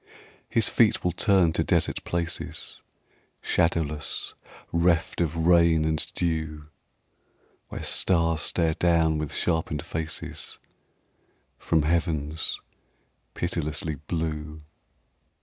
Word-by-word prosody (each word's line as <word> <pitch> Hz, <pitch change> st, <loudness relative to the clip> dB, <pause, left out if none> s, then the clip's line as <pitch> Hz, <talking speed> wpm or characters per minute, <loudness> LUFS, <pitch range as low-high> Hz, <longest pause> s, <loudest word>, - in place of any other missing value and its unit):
His 115 Hz, -, +2 dB
feet 115 Hz, -3 st, +3 dB
will 90 Hz, -, +2 dB
turn 90 Hz, -2 st, +3 dB
to -, -, +1 dB
desert -, -, +1 dB
places 85 Hz, -1 st, -4 dB, 0.6 s
Shadowless, 80 Hz, -3 st, -1 dB, 0.4 s
reft 85 Hz, 0 st, +2 dB
of 80 Hz, 0 st, 0 dB
rain 85 Hz, -2 st, +5 dB
and 80 Hz, -1 st, +1 dB
dew, 80 Hz, -3 st, -2 dB, 1.0 s
Where -, -, -7 dB
stars 85 Hz, -3 st, +2 dB
stare 80 Hz, +1 st, +1 dB
down 80 Hz, -2 st, +2 dB
with 75 Hz, -2 st, -3 dB
sharpened 80 Hz, -3 st, -1 dB
faces 80 Hz, -1 st, -3 dB, 1.0 s
From 80 Hz, -2 st, +1 dB
heavens 80 Hz, -1 st, -1 dB, 0.8 s
pitilessly 80 Hz, -2 st, -2 dB
blue. 75 Hz, 0 st, -4 dB
80 Hz, 95 wpm, -26 LUFS, 75-85 Hz, 1.0 s, rain